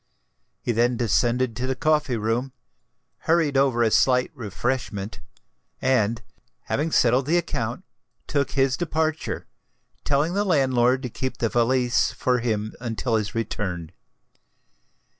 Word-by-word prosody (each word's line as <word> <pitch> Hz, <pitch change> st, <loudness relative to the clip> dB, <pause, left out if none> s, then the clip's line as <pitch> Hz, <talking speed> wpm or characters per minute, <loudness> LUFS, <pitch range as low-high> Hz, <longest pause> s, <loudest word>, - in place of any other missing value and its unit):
He -, -, 0 dB
then 120 Hz, +1 st, +2 dB
descended 120 Hz, +1 st, +1 dB
to 125 Hz, +2 st, -3 dB
the 130 Hz, -, -1 dB
coffee 150 Hz, -5 st, +1 dB
room, 115 Hz, +5 st, -1 dB, 0.8 s
hurried 160 Hz, -4 st, +3 dB
over 135 Hz, -3 st, +3 dB
a 110 Hz, -, +2 dB
slight 125 Hz, +1 st, +3 dB
refreshment, 110 Hz, -2 st, -3 dB, 0.6 s
and, 115 Hz, -4 st, +1 dB, 0.4 s
having 155 Hz, +3 st, -2 dB
settled 125 Hz, +1 st, +3 dB
the 170 Hz, +3 st, +3 dB
account, 120 Hz, -1 st, -3 dB, 0.4 s
took 140 Hz, -2 st, -1 dB
his 135 Hz, -1 st, +2 dB
departure, 160 Hz, -2 st, -2 dB, 0.6 s
telling 145 Hz, +4 st, +1 dB
the 200 Hz, +2 st, +1 dB
landlord 130 Hz, -7 st, +2 dB
to 125 Hz, -, -3 dB
keep 130 Hz, +3 st, -4 dB
the 115 Hz, -, 0 dB
valise 125 Hz, +1 st, +2 dB
for 125 Hz, -1 st, +1 dB
him 110 Hz, -2 st, -2 dB
until 120 Hz, 0 st, -2 dB
his 105 Hz, -2 st, 0 dB
return. 95 Hz, -7 st, -3 dB
125 Hz, 125 wpm, -24 LUFS, 115-140 Hz, 0.8 s, hurried